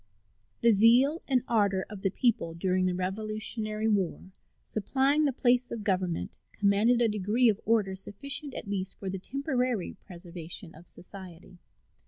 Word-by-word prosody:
The 235 - +6
zeal 240 - +5
and 255 -3 +2
ardor 200 -4 +2
of 210 -3 -9
the 195 - +1
people 200 -6 0
during 185 +1 +1
the 180 - 0
Revolutionary 215 +3 -2
war, 190 -3 -1 0.3
supplying 270 +8 +1
the 280 - +2
place 245 0 +2
of 230 -3 -5
government, 185 -4 -1 0.2
commanded 210 +4 +3
a - - +4
degree 215 +4 +2
of 210 -1 0
order 210 -4 +2
sufficient 275 +9 -4
at - - -6
least 195 -1 -3
for 190 -2 -4
the 195 - -4
temporary 255 - -1
preservation 170 0 -8
of 165 +3 -15
society. 180 -1 -12
210 Hz, 150 wpm, -29 LUFS, 185-240 Hz, 0.3 s, The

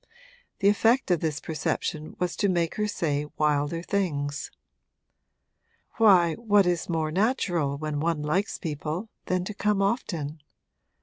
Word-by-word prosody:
The 200 - +4
effect 225 +2 +3
of 175 - +3
this 155 -2 -2
perception 155 0 -3
was 180 -1 -1
to 200 - +2
make 170 -3 +1
her 210 0 +1
say 150 -7 -1
wilder 150 +2 +1
things. 145 -8 -2 1.5
'Why, 185 -7 +6
what 205 -2 +3
is 175 -1 0
more 160 -2 0
natural, 175 - +1
when 150 0 -3
one 160 -1 0
likes 180 +7 0
people, 160 +5 -4 0.2
than 185 0 0
to 210 - -5
come 210 0 +1
often? 170 - -1
170 Hz, 135 wpm, -26 LUFS, 150-200 Hz, 1.5 s, Why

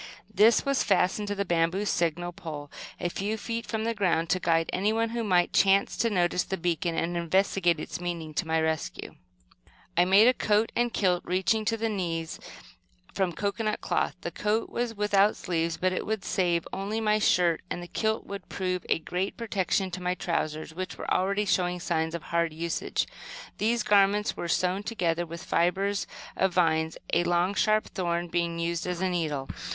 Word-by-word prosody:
This 215 +3 +5
was 275 -1 +2
fastened 195 +1 +2
to 205 - -2
the 200 0 -1
bamboo 175 +3 +1
signal 175 -2 0
pole, 155 -5 -8 0.3
a - - -1
few 205 +5 -2
feet 230 +2 -4
from 220 -1 -2
the 230 +1 0
ground, 175 -5 +1
to 185 - +2
guide 165 -2 +2
anyone 220 +4 +1
who 235 0 -2
might 180 -4 +2
chance 195 0 +4
to 230 - +2
notice 180 -3 +1
the 190 - -3
beacon 170 -1 -1
and 175 +1 -1
investigate 175 0 +2
its 175 - -6
meaning, 170 -3 -4
to 165 +2 -2
my 160 0 +2
rescue. 160 -1 -2 0.8
I 175 - +5
made 195 +5 +6
a 250 - +6
coat 215 -1 +1
and 240 0 +1
kilt 180 -5 +1
reaching 190 +4 +1
to 225 +1 +1
the 225 +1 -1
knees, 170 -6 -3 0.7
from 190 -2 0
cocoanut 210 +4 -2
cloth. - - 0
The - - -4
coat 215 +2 -1
was 240 -1 -2
without 205 0 +3
sleeves, 165 -2 -2
but 185 0 +1
it - - -2
would 215 -2 -3
save 175 -3 +1
my - - -3
only 215 +1 0
shirt, 175 -5 +3
and 175 - -4
the - - -8
kilt 220 +4 -1
would 200 0 -8
prove 185 -2 -2
a - - +3
great 180 +4 -3
protection 195 -4 -1
to 180 +1 -5
my 180 0 0
trousers, 155 -3 -2
which 185 +2 -5
were - - -2
already 200 +3 +1
showing 180 -2 +1
signs 160 -1 -1
of 170 - -6
hard 170 -1 0
usage. 170 +1 -2 0.5
These 230 +1 +1
garments 205 +1 +3
were 175 - -4
sewn 185 +3 +1
together 175 -6 -1
with 170 +1 -8
fibres 195 +4 +1 0.3
of 190 -2 +1
vines, 160 -2 +2 0.2
a 175 - +4
long, 175 +2 +1
sharp 215 +1 +2
thorn 175 -2 -2
being 170 -1 -1
used 170 +1 -2
as 180 -1 -2
a 190 - +1
needle. 155 -7 -2
180 Hz, 190 wpm, -28 LUFS, 170-205 Hz, 0.8 s, made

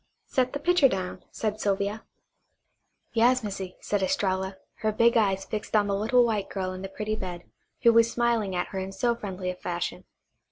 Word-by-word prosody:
"Set 255 -1 0
the 285 - -2
pitcher 340 -3 +4
down," 185 -2 -4
said 215 -1 -3
Sylvia. 200 +2 0 1.1
"Yas, 245 +2 +4
Missy," 195 -3 -5
said 205 -1 -1
Estralla, 190 0 0 0.2
her 215 0 0
big 230 +2 +4
eyes 195 -4 +2
fixed 215 0 -4
on 210 -1 +5
the 200 -1 0
little 240 +4 +4
white 215 -4 -1
girl 185 -1 -3
in 185 - -7
the 195 - -5
pretty 215 +2 -3
bed 180 -4 -6 0.4
who 235 - +7
was 230 0 +5
smiling 235 -5 +1
at 180 - -1
her 190 - -4
in 190 0 -4
so 235 +5 +1
friendly 190 -5 -4
a - - -8
fashion. 175 -1 -4
205 Hz, 190 wpm, -27 LUFS, 190-230 Hz, 1.1 s, who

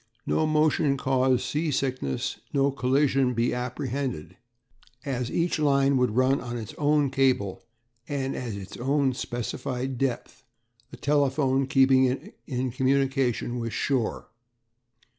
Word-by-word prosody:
No 155 - +1
motion 155 -2 +2
cause 130 -1 +1
sea 155 +2 -1
sickness, 130 - -2
no 140 0 +3
collision 135 0 +2
be 115 +2 +1
apprehended 125 - -4 0.7
as 125 -3 -2
each 170 +2 0
line 140 -2 +3
would 125 -4 +1
run 130 +2 +3
on 120 -1 -5
its 110 -3 -7
own 145 -2 +2
cable, 130 -8 +1 0.5
and 135 -2 -2
at 120 -4 -4
its 100 0 -8
own 135 +1 +1
specified 125 +1 -4
depth, 135 -3 -3 0.5
a - - -10
telephone 135 -2 +1
keeping 135 -1 +5
it 135 - -3
in 130 -2 -2
communication 130 -2 0
with 115 -1 -4
shore. 130 -5 -1
130 Hz, 125 wpm, -26 LUFS, 125-140 Hz, 0.7 s, keeping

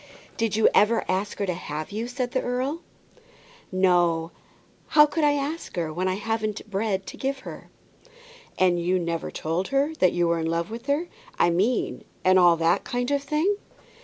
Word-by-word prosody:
"Did 225 -2 0
you 220 - +5
ever 220 +2 +3
ask 195 +2 -1
her 200 - -1
to 180 - -1
have 155 -2 -6
you?" 220 +3 -3
said 245 -1 -3
the 260 - 0
earl. 260 +6 -2 0.9
"No; 175 -3 +2 0.7
how 300 - +10
could 305 +1 -2
I 295 -1 +4
ask 290 +3 -4
her, 165 -3 -2
when 185 +3 -1
I 185 - 0
hadn't 215 +1 -3
bread 195 -1 -1
to - - -9
give 270 0 -2
her?" - - -10 0.9
"And 180 -2 +3
you 180 +2 +1
never 170 -2 -2
told 165 +4 -2
her 275 +3 +1
that 185 - +4
you 175 -1 +1
were 170 0 +1
in 160 - -1
love 170 +4 -2
with 235 +4 -7
her, 295 +5 0 0.3
I 175 - +4
mean, 210 +8 0 0.2
and 185 0 +6
all 175 -2 +6
that 165 +1 +2
kind 245 +1 -2
of 285 -1 +1
thing." 310 +8 0
205 Hz, 190 wpm, -25 LUFS, 175-260 Hz, 0.9 s, how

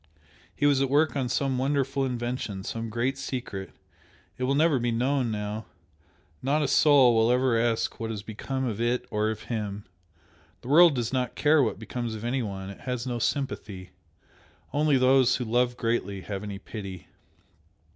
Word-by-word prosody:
He 145 - 0
was 140 -2 +4
at 135 - +1
work 150 +3 +3
on 130 -3 -1
some 130 0 0
wonderful 135 0 0
invention 120 -5 -3
some 115 +1 -4
great 125 +4 -1
secret! 95 -9 -5 0.7
it 125 - -2
will 135 +2 +1
never 155 -2 +3
be 120 0 0
known 125 +2 +1
now 105 0 -4 0.7
not 145 +3 +1
a - - +1
soul 135 -4 +5
will 115 +1 +3
ever 125 -1 +2
ask 115 0 0
what 115 - -3
has 105 -3 -5
become 130 +5 -4
of 115 -2 -3
it 120 +1 0
or 105 0 +1
of 110 -1 -5
him! 105 -3 -4 0.8
The 120 - -9
world 165 +1 +7
does 120 0 -2
not 125 -2 -1
care 150 0 +4
what 115 -7 0
becomes 115 +1 -4
of 110 - -8
anyone 105 -6 -3
it 100 - -12
has 125 -1 -4
no 120 -2 -3
sympathy. 105 -9 -3 0.8
Only 150 -1 +3
those 130 0 +4
who 125 - -3
love 120 +2 +1
greatly 115 -5 -1
have 100 0 -5
any 105 -2 -6
pity!" 100 -2 -8
120 Hz, 175 wpm, -27 LUFS, 110-135 Hz, 0.8 s, world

